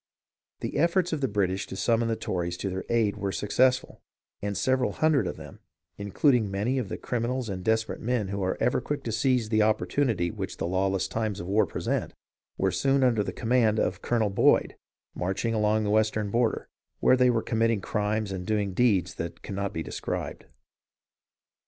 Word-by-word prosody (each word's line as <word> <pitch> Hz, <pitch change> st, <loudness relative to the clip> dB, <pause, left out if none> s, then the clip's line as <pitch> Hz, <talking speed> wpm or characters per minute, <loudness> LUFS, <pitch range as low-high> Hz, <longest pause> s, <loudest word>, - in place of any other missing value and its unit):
The -, -, -3 dB
efforts 170 Hz, +3 st, +2 dB
of 155 Hz, -, -2 dB
the 135 Hz, -, +2 dB
British 95 Hz, -2 st, -1 dB
to -, -, -7 dB
summon 115 Hz, +3 st, +1 dB
the 115 Hz, -, 0 dB
Tories 85 Hz, -4 st, -3 dB
to 95 Hz, -, -3 dB
their 95 Hz, +1 st, -4 dB
aid 110 Hz, -3 st, +1 dB
were 100 Hz, -1 st, -2 dB
successful, 125 Hz, +6 st, +1 dB, 0.4 s
and 100 Hz, -1 st, -2 dB
several 130 Hz, -1 st, +1 dB
hundred 150 Hz, -, +2 dB
of -, -, -5 dB
them, 75 Hz, -2 st, -11 dB, 0.4 s
including 110 Hz, +3 st, +2 dB
many 105 Hz, +7 st, 0 dB
of 110 Hz, -6 st, -4 dB
the -, -, -4 dB
criminals 120 Hz, 0 st, -2 dB
and 95 Hz, -2 st, -4 dB
desperate 110 Hz, +1 st, 0 dB
men 115 Hz, -4 st, -1 dB
who 100 Hz, 0 st, -3 dB
are 95 Hz, 0 st, -1 dB
ever 125 Hz, -, +1 dB
quick 145 Hz, -1 st, -4 dB
to 115 Hz, -, -3 dB
seize 120 Hz, 0 st, +1 dB
the 110 Hz, -1 st, +3 dB
opportunity 110 Hz, -3 st, +1 dB
which -, -, -5 dB
the -, -, -2 dB
lawless 95 Hz, +2 st, 0 dB
times 110 Hz, -3 st, -2 dB
of 85 Hz, -, -5 dB
war 100 Hz, +2 st, +2 dB
present, -, -, -2 dB, 0.4 s
were -, -, +1 dB
soon 135 Hz, 0 st, +2 dB
under 115 Hz, -5 st, +3 dB
the -, -, -4 dB
command 115 Hz, -2 st, +2 dB
of -, -, -1 dB
Colonel 110 Hz, -4 st, +1 dB
Boyd, -, -, +3 dB, 0.4 s
marching 95 Hz, +6 st, -2 dB
along 110 Hz, 0 st, +2 dB
the 105 Hz, -, 0 dB
western 105 Hz, -1 st, +1 dB
border, 115 Hz, 0 st, 0 dB, 0.3 s
where -, -, +5 dB
they 125 Hz, -1 st, +4 dB
were 115 Hz, -2 st, +1 dB
committing 115 Hz, -1 st, +1 dB
crimes 105 Hz, +1 st, -1 dB
and 95 Hz, -1 st, -4 dB
doing 105 Hz, -3 st, 0 dB
deeds 95 Hz, -5 st, +2 dB
that 85 Hz, 0 st, -6 dB
cannot 100 Hz, 0 st, -3 dB
be 80 Hz, -, -4 dB
described. -, -, -5 dB
110 Hz, 185 wpm, -27 LUFS, 100-120 Hz, 0.4 s, where